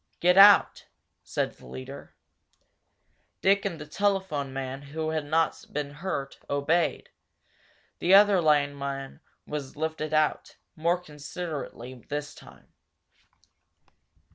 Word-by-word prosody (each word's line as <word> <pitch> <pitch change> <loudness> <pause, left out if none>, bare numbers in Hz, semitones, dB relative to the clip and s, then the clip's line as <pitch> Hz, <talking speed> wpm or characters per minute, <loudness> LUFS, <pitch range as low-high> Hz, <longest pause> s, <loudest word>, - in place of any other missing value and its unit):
"Get 180 +1 +4
out," 200 +1 +7 0.3
said - - -2
the - - -17
leader. 65 +1 -9 1.3
Dick 200 +2 +3
and 175 -5 -3
the 150 - -7
telephone 190 -5 -1
man 135 0 -5 0.2
who 160 0 -1
had 155 -1 -1
not 160 +2 0
been 145 -1 -3
hurt 145 -3 -5
obeyed, 145 +1 0 0.9
the 185 +3 +5
other 200 -2 +6
lineman 140 -3 0 0.3
was 145 -3 -6
lifted 155 0 -3
out, 155 -1 0 0.2
more 170 +3 +1
considerately 150 -5 -7 0.2
this 145 0 -4
time. - - -17
155 Hz, 110 wpm, -27 LUFS, 140-175 Hz, 1.3 s, out